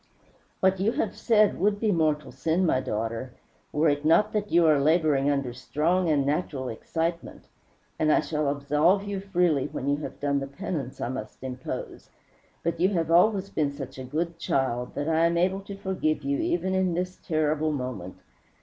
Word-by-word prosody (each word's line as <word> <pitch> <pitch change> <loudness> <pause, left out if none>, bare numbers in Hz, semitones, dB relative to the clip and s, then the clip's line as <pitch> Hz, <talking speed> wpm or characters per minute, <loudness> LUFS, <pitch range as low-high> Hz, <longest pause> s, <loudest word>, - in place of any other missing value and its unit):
"What 190 0 +3
you 210 +5 +1
have 220 - -1
said 215 -3 +3
would 205 +2 +2
be 215 -1 +1
mortal 155 -4 +1
sin, 160 +8 0
my 130 - +2
daughter, 115 +1 -3 0.4
were 150 +2 +2
it 145 0 +1
not 170 +7 +4
that 210 -1 -2
you 170 0 +5
are 155 -3 +5
laboring 150 -2 +3
under 140 -4 -1
strong 160 +8 0
and 145 -3 +2
natural 140 -3 -1
excitement; 165 +8 -3 0.6
and 155 -1 +3
I - - +5
shall 150 -2 -1
absolve 150 +7 +2
you 205 -1 -3
freely 180 -7 +1
when 135 - -5
you 140 0 +2
have 150 - -7
done 140 -1 +1
the 135 - -4
penance 140 -4 -5
I - - -2
must 125 -1 -7
impose. 130 -1 -6 0.7
You 185 +2 +4
have 165 -5 -1
always 195 +3 +4
been 150 -3 0
such 135 -2 -8
a - - -5
good 165 +5 -3
child 125 -5 -1
that 145 +1 -2
I 165 +1 +3
am 170 0 0
able 185 +3 +2
to 200 0 -8
forgive 155 -6 -1
you 140 0 0
even 180 +2 0
in 190 -2 +1
this 180 +1 -3
terrible 155 -1 0
moment. 125 -10 -5
155 Hz, 185 wpm, -26 LUFS, 140-180 Hz, 0.7 s, you